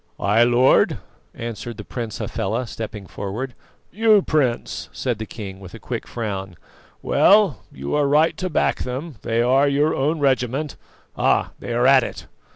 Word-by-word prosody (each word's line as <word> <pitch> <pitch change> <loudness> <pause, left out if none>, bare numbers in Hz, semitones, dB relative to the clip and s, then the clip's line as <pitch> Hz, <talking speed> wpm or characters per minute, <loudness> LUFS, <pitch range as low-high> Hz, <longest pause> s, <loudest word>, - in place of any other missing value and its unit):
"I, 105 +4 +4
Lord," 120 +2 +4 0.4
answered 115 0 -6
the 105 - -7
Prince 115 0 -5
Hafela, 115 +3 -2
stepping 110 -3 -7
forward. 110 +8 -5 0.4
"You, 215 -1 +4
Prince!" 135 -6 -1
said 120 -5 -3
the 110 - -5
king 95 -3 -8
with 95 -2 -11
a - - -10
quick - - -5
frown. 95 -5 -4 0.5
"Well, 205 -6 +4
you 70 +1 -5
are 145 -1 +2
right 150 +3 +3
to 185 0 -3
back 155 - +1
them, 130 +3 -5
they 115 +1 0
are 135 +3 +4
your 145 +2 +2
own 150 +5 0
regiment. 135 +1 0 0.4
Ah! - - +2
they - - -6
are 120 +1 +2
at 135 0 +7
it." - - -6
125 Hz, 160 wpm, -22 LUFS, 110-145 Hz, 0.5 s, at